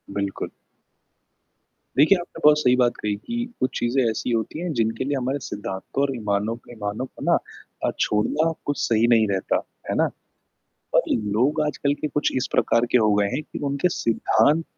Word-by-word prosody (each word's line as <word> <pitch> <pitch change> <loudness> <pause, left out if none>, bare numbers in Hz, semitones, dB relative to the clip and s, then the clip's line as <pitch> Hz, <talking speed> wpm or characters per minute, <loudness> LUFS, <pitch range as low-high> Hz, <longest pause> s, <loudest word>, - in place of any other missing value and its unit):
बिल्कुल। 100 -1 -3 1.5
देखिए, 155 +8 +6
आपने 175 - -9
बहुत 150 0 +7
सही 125 -4 +4
बात 120 -1 +3
कही 105 -1 -1
कि 235 - -4
कुछ 130 0 0
चीज़ें 120 +3 +1
ऐसी 110 +3 -2
होती 115 +6 -1
हैं 175 0 -2
जिनके 115 -1 0
लिए 140 +2 -1
हमारे 135 +2 -1
सिद्धांतों 100 +5 -4
और 135 -2 0
ईमानों 105 0 -1 0.2
ईमानों 105 +1 -4
को - - -12
ना - - +6 0.5
अ, - - +2
छोड़ना 150 +10 +1
कुछ 145 -1 -1
सही 115 0 +3
नहीं 115 -2 +4
रहता, 95 -1 0 0.3
है - - 0
ना? - - +3 0.9
पर - - +6
लोग 115 +8 +1
आजकल 145 -1 0
के 150 - -1
कुछ 150 0 0
इस 130 - 0
प्रकार 115 +1 +3
के 125 - +6
हो 110 -2 +3
गए 100 0 +3
हैं 155 - -1
कि - - -8
उनके 140 +6 +1
सिद्धांत 145 +2 +2
120 Hz, 180 wpm, -24 LUFS, 110-145 Hz, 1.5 s, बहुत